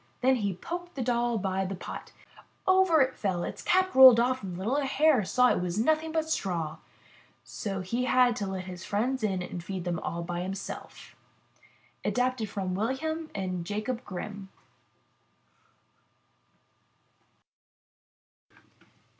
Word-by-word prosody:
Then 260 +1 +4
he 200 -5 -1
poked 350 - -6
the 265 - -2
doll 240 -1 +1
by 190 -1 -1
the 190 +1 -3
pot. 180 - -8 0.5
Over 375 -4 +5
it 260 0 +2
fell, 185 -4 -2
its - - -5
cap 370 0 +2
rolled 260 -3 +10
off, 255 +2 +1
and 185 -3 -6
the - - -7
little 220 +9 -1
Hare 285 -2 +3
saw 250 +6 +3
it - - 0
was 180 +1 -2
nothing 315 +7 +2
at 320 - -8
all 320 - +4
but 315 - -11
straw! 170 - -2 0.7
So 195 -2 -4
he 235 +7 -2
had 250 -2 +4
to 200 - -2
let 190 -1 -4
his 180 -1 -8
friends 245 +6 -1
in 190 -4 0
and 175 -1 -6
feed 190 -1 -5
them 175 -2 -2
all 170 0 -4
by 175 0 -4
himself. 190 +2 -7 0.4
— - - -31
Adapted 250 -3 0
from 190 -2 -3
Wilhelm 310 - -2
and 185 -3 -3
Jacob 215 +6 -3
Grimm. 200 0 -7
215 Hz, 150 wpm, -28 LUFS, 185-260 Hz, 0.7 s, rolled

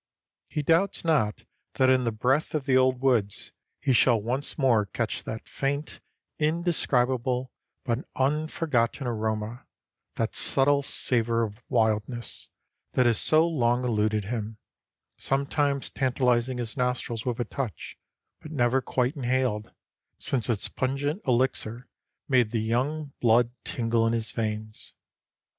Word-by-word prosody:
He 150 - -3
doubts 170 +5 +2
not 135 -11 +1 0.3
that 130 - +3
in 130 -1 +2
the 115 - +1
breath 130 +9 0
of 145 -3 -2
the 135 -2 +2
old 130 -1 +3
woods 115 -7 0 0.3
he 135 - +1
shall 120 -1 +4
once 125 +7 -2
more 120 -8 +3
catch - - -3
that 110 0 -6
faint, 140 +2 -3 0.4
indescribable, 130 -6 0 0.3
but 120 +1 -2
unforgotten 140 -2 0
aroma, 110 0 -3 0.5
that - - -2
subtle 140 +1 +4
savor 115 -4 +1
of 105 +1 -6
wildness, 115 0 -1 0.4
that 125 - +3
has 115 -3 +3
so 160 +2 +5
long 125 -6 +1
eluded 110 -2 +1
him, 110 -1 -4 0.6
sometimes 140 0 0
tantalizing 125 -1 +1
his 115 -2 -4
nostrils 125 -3 -2
with 125 -2 -3
a 120 - 0
touch, 120 - -5 0.5
but 155 - -10
never 130 -2 +2
quite 125 +3 -1
inhaled 125 -5 -1 0.5
since 125 -2 +2
its 110 -4 +2
pungent 140 +7 -2
elixir 125 -1 0 0.4
made 125 -5 +3
the 115 0 -1
young 140 +6 -1
blood 120 0 +4
tingle 115 -1 0
in 115 - +1
his 115 -1 -1
veins. 110 -1 -4
125 Hz, 130 wpm, -26 LUFS, 115-135 Hz, 0.6 s, so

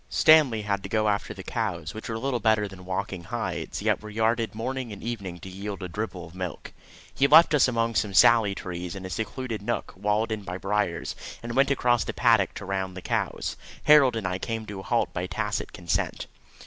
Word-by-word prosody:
Stanley 145 -9 +5
had 100 -2 -1
to 95 - -7
go 110 0 +1
after 100 -1 -1
the - - -8
cows, 80 -3 -3
which 110 - -7
were 110 - -2
little 130 +1 -1
better 110 -1 +2
than 95 -2 -12
walking 95 -1 -4
hides, - - -4
yet - - +1
were 110 - -8
yarded 110 +1 0
morning 125 +1 -3
and 100 - -9
evening 100 -7 -4
to - - -9
yield 100 +1 -6
a - - -3
dribble 90 -1 -5
of 80 - -14
milk. 90 -3 -6 0.4
He 140 - +3
left 165 +2 +7
us 145 -4 +5
among 115 -2 0
some 105 -3 0
sallie 105 -1 +6
trees, 90 -1 -5
in 95 -1 -7
a 95 - -6
secluded 115 +1 -4
nook, 120 +3 -3
walled 105 +4 0
in 110 -1 -2
by 90 -2 -5
briers, 100 -2 -1 0.3
and 115 0 -5
went 135 +1 +4
across 120 -4 +2
the - - -4
paddock 115 -6 +3
to 100 - -7
roundup 95 -1 -3
the 95 - -8
cows. - - -1 0.3
Harold 145 -5 +6
and 110 -4 -2
I 90 0 -2
came 115 +1 -3
to 100 -2 -7
a - - -6
halt 120 +4 0
by 90 +1 -2
tacit 105 +2 -3
consent. 85 -4 -2
105 Hz, 215 wpm, -26 LUFS, 95-115 Hz, 0.4 s, left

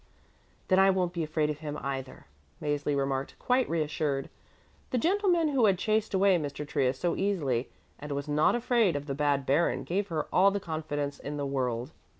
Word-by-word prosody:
"Then 185 -1 +4
I 195 0 +6
won't 185 -2 +1
be 170 - -2
afraid 155 -1 0
of 150 - -7
him 150 -1 -5
either," 135 -1 -5 0.3
Mäzli 145 -1 -1
remarked, 135 0 -2
quite 250 0 +1
reassured. 150 -3 -1 0.6
The 255 - 0
gentleman 350 - +2
who 265 -5 +3
had 190 -2 +3
chased 215 0 0
away 190 -1 +4
Mr. 145 -1 -5
Trius 130 -3 0
so 175 +4 0
easily 145 -12 0 0.3
and 150 0 -7
was 140 +1 -4
not 150 +6 +3
afraid 235 - +2
of 145 0 -3
the 140 - -3
bad 140 -1 +1
baron 145 +6 +1
gave 195 +3 -1
her 160 -4 -2
all 195 +2 +6
the 200 0 -2
confidence 150 -4 -4
in 145 +1 -5
the 145 - -2
world. 130 -1 -2
150 Hz, 185 wpm, -29 LUFS, 140-195 Hz, 0.6 s, I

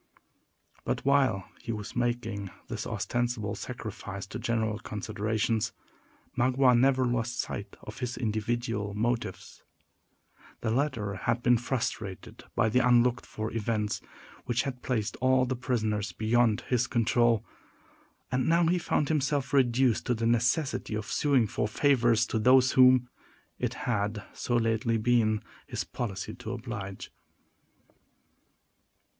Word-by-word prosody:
But, - - -2
while 135 -9 +3
he 115 - -4
was 105 -2 -6
making 115 -5 -1 0.2
this - - -4
ostensible 120 -4 -2
sacrifice 105 -5 -6
to 115 +5 -7
general 110 -2 -1
considerations, 110 +1 -2 0.6
Magua 125 +1 +4
never 130 +1 +4
lost 120 0 -1
sight 100 0 -4
of 105 - -9
his 125 -1 -3
individual 110 -2 -2
motives. 115 -4 -2 1.0
The 110 - -1
latter 115 -6 0
had 115 +4 -1
been 120 -1 +4
frustrated 110 -6 -4
by - - +3
the 110 +3 +3
unlooked 125 0 +3
for 110 +1 -4
events 110 -2 -1 0.4
which 120 -1 0
had 125 -2 -5
placed 110 -5 -2
all 130 0 +3
his 130 +1 -2
prisoners 110 -5 -1
beyond 110 0 +2
his 125 -1 0
control; 115 -1 +2 0.9
and 125 0 +1
he - - +1
now 170 0 +4
found 150 -3 0
himself 145 -3 0
reduced 130 -3 +3
to 125 - +2
the 115 0 -2
necessity 120 +1 +1
of 105 0 -3
suing 140 -5 +3
for 105 -1 -1
favors 120 -2 +3
to 110 - -1
those 130 +3 +5
whom 130 -1 +6 0.5
it 125 -1 -2
had 105 -3 -1
so 120 - -2
lately 115 0 +1
been 110 -2 +2 0.2
his - - -3
policy 100 -6 -5
to 110 - -6
oblige. 105 -6 -6
120 Hz, 130 wpm, -29 LUFS, 110-125 Hz, 1.0 s, whom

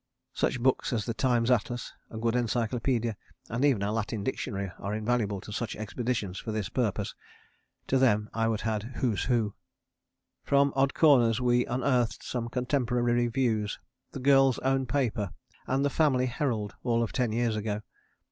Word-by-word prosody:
Such 130 - 0
books 130 +2 +1
as 110 -4 -1
the 115 - -2
Times 120 0 +2
Atlas, 120 0 0 0.2
a 110 - -8
good 115 +1 0
encyclopaedia 120 0 0 0.4
and 115 +4 -1
even 130 -9 +3
a 100 - 0
Latin 110 -1 -2
Dictionary 100 -5 -3
are 100 +2 -3
invaluable 110 -2 0
to - - -10
such 110 +1 -3
expeditions 110 -3 -3
for 110 - -5
this 105 -3 -2
purpose. 105 -5 -1 0.7
To 135 - +2
them 105 -5 +3
I 115 0 +1
would 110 -2 0
add 110 -2 0
Who's 115 -6 0
Who. 115 -5 +1 0.9
From 140 0 +3
odd 135 0 +2
corners 125 -7 +5
we 125 -1 +2
unearthed 125 -1 0
some 120 -2 -3
Contemporary 125 -1 0
Reviews, 120 -3 +1 0.3
the - - -6
Girls' 135 -1 +5
Own 135 -1 +2
Paper 115 - -1 0.3
and 135 +2 +1
the 140 - +1
Family 135 -5 +3
Herald, 120 -5 -2
all 115 -1 +1
of 115 - -3
ten 125 -4 0
years 115 0 0
ago! 105 0 -3
120 Hz, 165 wpm, -29 LUFS, 110-130 Hz, 0.9 s, corners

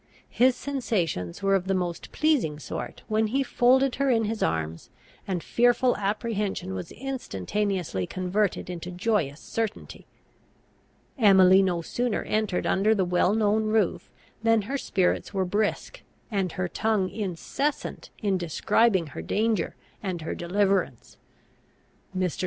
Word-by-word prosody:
His 250 +1 +4
sensations 195 - -2
were 195 0 +3
of 190 -1 +1
the 195 - +1
most 175 -2 -3
pleasing 275 - +1
sort 150 - -6
when 220 0 +1
he 270 +5 +1
folded 260 +1 +3
her 275 0 +1
in 230 -3 +3
his 220 +1 -3
arms, 80 0 -2 0.4
and 180 -4 -2
fearful 245 - +3
apprehension 205 - -2
was 95 -1 -6
instantaneously 195 - -2
converted 185 +2 -1
into 175 0 -6
joyous 180 -6 -1
certainty. 225 -2 -5 1.1
Emily 190 -3 +7
no 175 -3 0
sooner 245 +5 -1
entered 215 -4 -1
under 210 +3 +3
the 190 -3 +1
well 180 +3 +2
known 215 0 +2
roof 215 -4 0 0.3
than 225 -1 +3
her 270 +8 -4
spirits 195 -6 0
were 190 -1 +1
brisk, 210 - -1 0.3
and 195 -4 -1
her 185 -2 -2
tongue 215 0 0
incessant 210 - -3
in 195 -3 +1
describing 185 +3 +2
her - - -5
danger 215 - 0 0.3
and 185 -5 -4
her - - -3
deliverance. 190 - -1 1.0
Mr. 185 -2 -1
200 Hz, 135 wpm, -26 LUFS, 180-225 Hz, 1.1 s, Emily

